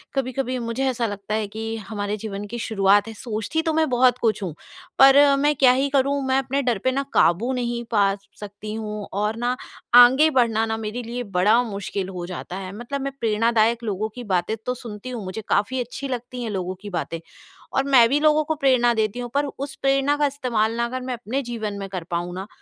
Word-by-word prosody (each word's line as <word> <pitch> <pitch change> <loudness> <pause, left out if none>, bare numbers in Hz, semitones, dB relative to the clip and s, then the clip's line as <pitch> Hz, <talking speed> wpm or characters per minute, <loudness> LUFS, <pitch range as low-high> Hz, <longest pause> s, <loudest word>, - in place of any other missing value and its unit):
कभी-कभी 255 -1 -1
मुझे 235 +3 -2
ऐसा 240 -2 -1
लगता 205 +1 -4
है 215 -1 -1
कि 225 +2 -5
हमारे 205 0 -3
जीवन 205 -1 -6
की 240 +3 -6
शुरुआत 205 -2 +3
है। 225 - -6
सोचती 220 +7 -3
तो 320 -1 -1
मैं 315 -2 +2
बहुत 250 0 +4
कुछ 220 -4 0
हूँ, 175 -5 -4 0.5
पर 270 0 +8 0.2
मैं 295 +1 +2
क्या 260 -2 +6
ही 270 +2 +1
करूँ 280 0 +1
मैं 260 0 +2
अपने 270 +1 -1
डर 245 -4 +1
पे 260 - +2
ना 275 +2 -1
काबू 205 +10 +3
नहीं 240 -1 -2
पा 200 -3 +3
स 200 0 -23
सकती 210 +1 -7
हूँ 210 -2 -5
और 210 +2 -1
ना 245 +1 0 0.5
आगे 265 +6 +5
बढ़ना 230 -6 +2
ना 220 0 -2
मेरे 225 +2 -4
लिए 240 +2 -4
बड़ा 210 +6 +4
मुश्किल 200 -3 -4
हो 180 -2 -5
जाता 180 0 -6
है, 190 -1 -6
मतलब 270 +4 -5
मैं 275 0 -3
प्रेरणादायक 230 +1 +2
लोगों 215 0 -2
की 245 - -7
बातें 180 +4 +1
तो 250 - 0
सुनती 230 -1 -8
हूँ, 240 -4 -5
मुझे 190 +4 -5
काफ़ी 255 +6 +1
अच्छी 250 +3 -6
लगती 250 -1 -5
हैं 230 - -3
लोगों 185 -2 -3
की 210 - -7
बातें 165 - -5 0.5
और 270 - +2
मैं 265 -4 +6
भी 285 +3 +2
लोगों 305 0 +4
को 315 - -1
प्रेरणा 255 -4 +3
देती 220 +1 -1
हूँ 245 0 -4
पर 285 +1 +1
उस 275 0 -5
प्रेरणा 275 +1 +2
का 295 - +2
इस्तेमाल 235 -5 -1
ना 235 - +1
अगर 255 +2 -4
मैं 255 0 -4
अपने 245 +3 -3
जीवन 225 -4 -4
में 195 - -5
कर 185 -3 -5
पाऊँ 175 +1 -2
ना, 190 +2 -6
235 Hz, 225 wpm, -23 LUFS, 210-260 Hz, 0.5 s, पर